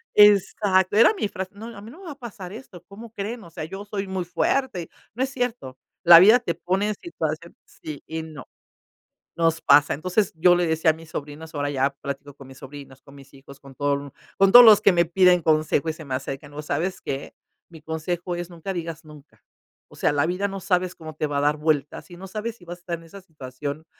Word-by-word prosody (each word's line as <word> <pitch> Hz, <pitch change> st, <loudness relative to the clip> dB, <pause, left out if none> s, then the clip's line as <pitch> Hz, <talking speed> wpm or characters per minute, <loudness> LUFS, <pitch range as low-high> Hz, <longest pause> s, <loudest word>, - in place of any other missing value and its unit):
Exacto, 200 Hz, -1 st, +4 dB
era 230 Hz, -, +6 dB
mi 380 Hz, -, -2 dB
frase: 190 Hz, -1 st, -6 dB
"No, 220 Hz, +3 st, -9 dB
a 200 Hz, -, -10 dB
mí 220 Hz, +3 st, -11 dB
no 340 Hz, -, -14 dB
me 390 Hz, -, -13 dB
va 320 Hz, -, -6 dB
a -, -, -9 dB
pasar 205 Hz, -8 st, -9 dB
esto, 200 Hz, -8 st, -12 dB
¿cómo 220 Hz, +3 st, -12 dB
creen? 225 Hz, +2 st, -5 dB
O 170 Hz, -, -13 dB
sea, 165 Hz, -, -7 dB
yo 195 Hz, +5 st, -8 dB
soy 200 Hz, -1 st, -4 dB
muy 190 Hz, -2 st, -3 dB
fuerte". 180 Hz, +1 st, -1 dB, 0.2 s
No 250 Hz, +4 st, -1 dB
es 265 Hz, -, -2 dB
cierto, 245 Hz, -, -4 dB, 0.3 s
la 170 Hz, -1 st, +10 dB
vida 215 Hz, +7 st, +7 dB
te 170 Hz, -9 st, -3 dB
pone 190 Hz, +4 st, -1 dB
en 210 Hz, -, -2 dB
situación 165 Hz, -, -5 dB
sí 150 Hz, -2 st, -10 dB
y 160 Hz, 0 st, -5 dB
no, 155 Hz, -4 st, -11 dB, 0.9 s
nos 165 Hz, -1 st, +1 dB
pasa, 145 Hz, +1 st, +5 dB
entonces 185 Hz, +6 st, -1 dB
yo 175 Hz, +2 st, +5 dB
le 175 Hz, -1 st, +1 dB
decía 160 Hz, 0 st, +2 dB
a -, -, +4 dB
mis 160 Hz, -1 st, -14 dB
sobrinos, 150 Hz, +2 st, -8 dB
ahora 145 Hz, 0 st, -2 dB
ya 135 Hz, 0 st, +1 dB
platico 140 Hz, 0 st, -8 dB
con 135 Hz, -2 st, -14 dB
mis 135 Hz, -, -14 dB
sobrinos, 135 Hz, -1 st, -12 dB
con 140 Hz, -, -17 dB
mis 140 Hz, 0 st, -16 dB
hijos, 135 Hz, 0 st, -15 dB
con 135 Hz, -1 st, -14 dB
todo 145 Hz, 0 st, 0 dB
el 140 Hz, -1 st, -6 dB, 0.3 s
con 195 Hz, 0 st, +4 dB
todos 245 Hz, 0 st, +11 dB
los 215 Hz, -2 st, +8 dB
que 200 Hz, -, +5 dB
me 170 Hz, 0 st, +3 dB
piden 180 Hz, 0 st, +4 dB
consejo 155 Hz, 0 st, +1 dB
y 160 Hz, -, +1 dB
se 160 Hz, 0 st, -11 dB
me 135 Hz, -, -4 dB
acercan, 135 Hz, +2 st, -5 dB
¿no 150 Hz, +1 st, -7 dB
sabes 165 Hz, +6 st, -2 dB
qué? 135 Hz, 0 st, -6 dB, 0.4 s
Mi 160 Hz, -2 st, -13 dB
consejo 170 Hz, +3 st, -4 dB
es: 175 Hz, 0 st, -6 dB
"Nunca 175 Hz, +3 st, -6 dB
digas 165 Hz, -2 st, -6 dB
nunca". 150 Hz, -1 st, -17 dB, 0.5 s
O -, -, -18 dB
sea, -, -, +1 dB
la 145 Hz, 0 st, +1 dB
vida 185 Hz, +4 st, -1 dB
no 195 Hz, 0 st, -6 dB
sabes 180 Hz, -1 st, 0 dB
cómo 155 Hz, -2 st, -10 dB
te 155 Hz, -1 st, -2 dB
va 145 Hz, -, -2 dB
a -, -, +2 dB
dar 150 Hz, +1 st, +1 dB
vueltas, 150 Hz, +2 st, -1 dB
y 175 Hz, -, -11 dB
no 190 Hz, -, -10 dB
sabes 220 Hz, +4 st, -5 dB
si 180 Hz, -, -18 dB
vas 175 Hz, +1 st, -8 dB
a -, -, -26 dB
estar 170 Hz, -1 st, -5 dB
en 165 Hz, -, -16 dB
esa 195 Hz, +4 st, -12 dB
situación, 145 Hz, -1 st, -8 dB
170 Hz, 240 wpm, -24 LUFS, 150-195 Hz, 0.9 s, todos